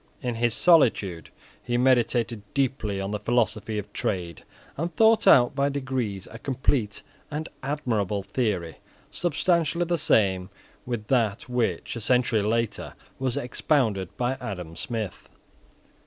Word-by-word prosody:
In 125 -3 -2
his 115 0 0
solitude 110 - +3 0.3
he 120 -1 -1
meditated 120 -3 +2
deeply 130 -7 0
on 95 +1 -3
the 105 - -2
philosophy 110 -1 0
of 105 - -6
trade, 85 -5 -3 0.3
and 165 +4 -2
thought 225 0 +4
out 120 -2 +7
by 140 0 +1
degrees 130 -8 -3
a 115 - -9
complete 125 -5 -1 0.3
and 155 +2 -4
admirable 110 -9 -1
theory, 100 - -2 0.3
substantially 170 0 +1
the 170 -1 0
same 95 -7 +2 0.4
with 120 -4 -3
that 115 -6 +1
which, 125 -1 -1
a 115 - -5
century 120 -1 +2
later, 115 +2 -1 0.2
was 130 -2 -1
expounded 120 - 0
by 125 +2 0
Adam 90 -5 -6
Smith. 110 -4 -5
120 Hz, 130 wpm, -26 LUFS, 105-135 Hz, 0.4 s, out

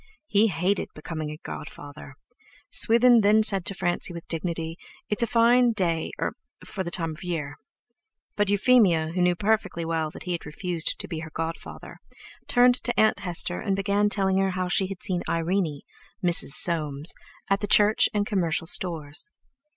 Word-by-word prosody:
He 215 -5 +3
hated 190 +1 -1
becoming 155 0 -6
a 150 - -8
godfather. 145 -2 -10 0.6
Swithin 235 +1 +5
then 215 +2 +4
said 195 -4 +1
to 195 - -2
Francie 175 0 -2
with 170 - -9
dignity: 165 0 -4 0.3
"It's 210 - 0
a 235 - +1
fine 235 +1 +3
day—er—for 180 +1 -3
the 170 - -5
time 165 -2 -3
of 155 +4 -10
year." 160 -5 -4 0.8
But 205 -1 0
Euphemia, 200 -7 +3
who 180 - -1
knew 180 0 +2
perfectly 200 -4 -1
well 160 -1 -2
that - - -11
he 180 - -5
had 170 - -3
refused 170 +2 -3
to - - -4
be 165 -3 -5
her 160 0 -8
godfather, 165 +2 -7 0.5
turned 245 0 +3
to 240 +1 -1
Aunt 215 0 +3
Hester, 175 -1 +1
and 195 -3 -1
began 200 +1 0
telling 195 -2 +1
her 195 0 +1
how 185 -1 -3
she 185 +1 +1
had 190 -1 -8
seen 180 -2 -1
Irene—Mrs. 170 0 -2
Soames—at 160 +4 +1
the 205 - -2
Church 210 +1 +5
and 205 -1 -1
Commercial 170 -6 -1
Stores. 165 - 0
180 Hz, 160 wpm, -25 LUFS, 165-205 Hz, 0.8 s, Swithin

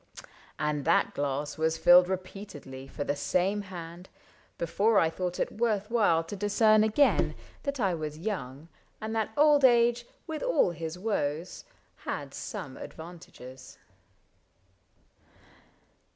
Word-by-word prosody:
And 150 -1 -1
that - - +3
glass 145 +1 -3
Was 160 0 +1
filled 180 +1 +7
repeatedly 185 -8 -7
for 145 - -5
the 145 - -1
same 185 +7 0
hand 175 -2 -9 0.5
Before 200 +6 +1
I 160 -3 +3
thought 180 +1 -4
it - - -1
worth 215 -2 -1
while 205 -9 +3
to 165 +5 -7
discern 215 +2 +4
Again 220 +7 +2 0.3
that 280 -2 -3
I 195 -5 +1
was 155 -2 -5
young, 155 -6 -5 0.3
and 220 0 -4
that 220 -1 0
old 295 -1 +5
age, 240 -1 +4 0.2
With 315 -2 -5
all - - +2
his 165 0 -6
woes, 180 -5 -3 0.3
had - - -5
some - - -6
advantages. 145 -6 -11
180 Hz, 125 wpm, -29 LUFS, 160-220 Hz, 0.5 s, filled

